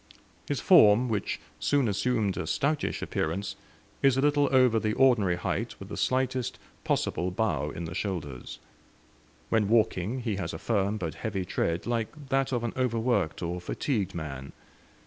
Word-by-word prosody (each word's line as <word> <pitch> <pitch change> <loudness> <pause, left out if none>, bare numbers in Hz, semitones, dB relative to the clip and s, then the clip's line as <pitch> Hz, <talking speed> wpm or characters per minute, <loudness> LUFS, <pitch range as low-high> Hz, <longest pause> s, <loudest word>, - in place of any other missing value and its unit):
His 145 - -1
form, 120 - +6
which 105 -3 -2 0.2
soon 140 -4 +2
assumed 105 0 0
a - - -4
stoutish 145 +1 0
appearance, 95 +5 -2 0.5
is 135 -1 +4
a - - +3
little 145 0 +3
over 125 -4 +5
the 110 -1 0
ordinary 120 -9 +4
height 90 - -3
with - - -9
the - - -5
slightest 130 -1 0 0.3
possible 90 - 0
bow 95 -5 -1
in 85 +3 -5
the 80 - -6
shoulders. 75 - -4 0.9
When 105 -3 +2
walking 110 +1 +1
he 110 -5 -2
has 85 -5 -3
a - - -4
firm 100 +1 0
but 85 -6 -3
heavy 100 -5 -3
tread, 85 -1 -1
like 120 +5 -3
that 135 0 +1
of 120 -2 -1
an 120 - -2
overworked 115 -9 0
or 90 +1 -3
fatigued 100 0 -2
man. 70 -4 -6
110 Hz, 160 wpm, -28 LUFS, 90-130 Hz, 0.9 s, form